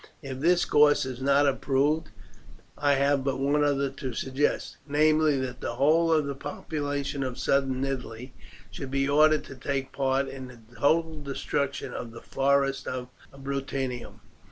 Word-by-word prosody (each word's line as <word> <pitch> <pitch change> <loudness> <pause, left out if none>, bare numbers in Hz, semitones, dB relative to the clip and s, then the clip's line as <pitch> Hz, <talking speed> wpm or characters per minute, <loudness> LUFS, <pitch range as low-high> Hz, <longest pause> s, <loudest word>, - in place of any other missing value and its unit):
If 135 -2 -6
this 175 +4 +3
course 145 -1 +4
is 130 -1 -6
not 140 +2 +4
approved 140 +3 +1 0.7
I 145 -1 +2
have 140 0 +2
but 135 -1 -1
one 140 +2 +2
other 140 -2 +1
to 130 -2 -5
suggest, 135 +4 -1
namely, 155 0 +3
that 125 -1 -5
the 120 - -3
whole 160 +5 +3
of 155 -2 +3
the 140 - -3
population 145 0 -4
of 130 -1 -3
southern 135 -1 +1
Italy 125 -2 -5 0.4
should 130 +7 -6
be 135 0 0
ordered 155 +2 +4
to 135 - -10
take 135 0 -3
part 135 0 0
in 130 -1 -7
the 125 -2 -13 0.2
total 160 +2 +1
destruction 140 0 -3
of 115 -2 -6
the 115 - -10
forests 135 0 +1
of 125 -1 -4 0.2
Bruttium. 135 -2 -4
140 Hz, 155 wpm, -27 LUFS, 130-145 Hz, 0.7 s, course